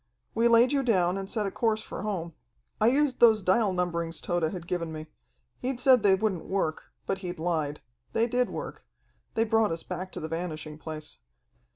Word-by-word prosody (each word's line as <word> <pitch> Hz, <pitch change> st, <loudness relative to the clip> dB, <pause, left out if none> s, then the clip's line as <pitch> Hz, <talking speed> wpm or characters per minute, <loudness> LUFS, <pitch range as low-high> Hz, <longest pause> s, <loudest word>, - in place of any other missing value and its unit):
"We 230 Hz, +1 st, +3 dB
laid 235 Hz, +1 st, +6 dB
you 280 Hz, -1 st, +2 dB
down 185 Hz, -8 st, +2 dB
and 195 Hz, 0 st, -6 dB
set 215 Hz, -2 st, -1 dB
a 195 Hz, -, -2 dB
course 220 Hz, +1 st, 0 dB
for -, -, -7 dB
home. 180 Hz, -5 st, -3 dB, 0.5 s
I 215 Hz, -, +4 dB
used 270 Hz, +1 st, +2 dB
those 220 Hz, -3 st, +6 dB
dial 195 Hz, +2 st, +3 dB
numberings 170 Hz, -2 st, -1 dB
Tode 175 Hz, -3 st, 0 dB
had 180 Hz, -3 st, -6 dB
given 170 Hz, -2 st, -2 dB
me. 155 Hz, 0 st, -6 dB, 0.5 s
He'd 255 Hz, 0 st, -3 dB
said 255 Hz, -2 st, +6 dB
they 200 Hz, -2 st, +5 dB
wouldn't 190 Hz, -4 st, -1 dB
work, 190 Hz, -5 st, -1 dB, 0.2 s
but 195 Hz, -, -1 dB
he'd 180 Hz, -2 st, -5 dB
lied. 160 Hz, -3 st, -1 dB, 0.3 s
They 225 Hz, -, +3 dB
did 245 Hz, +1 st, +1 dB
work. -, -, -6 dB, 0.5 s
They 225 Hz, -, +3 dB
brought 225 Hz, -3 st, +2 dB
us 165 Hz, 0 st, -3 dB
back 185 Hz, +1 st, -5 dB
to -, -, -5 dB
the 160 Hz, -, -4 dB
Vanishing 155 Hz, -2 st, -5 dB
Place. 155 Hz, -2 st, -6 dB
190 Hz, 195 wpm, -28 LUFS, 170-225 Hz, 0.5 s, laid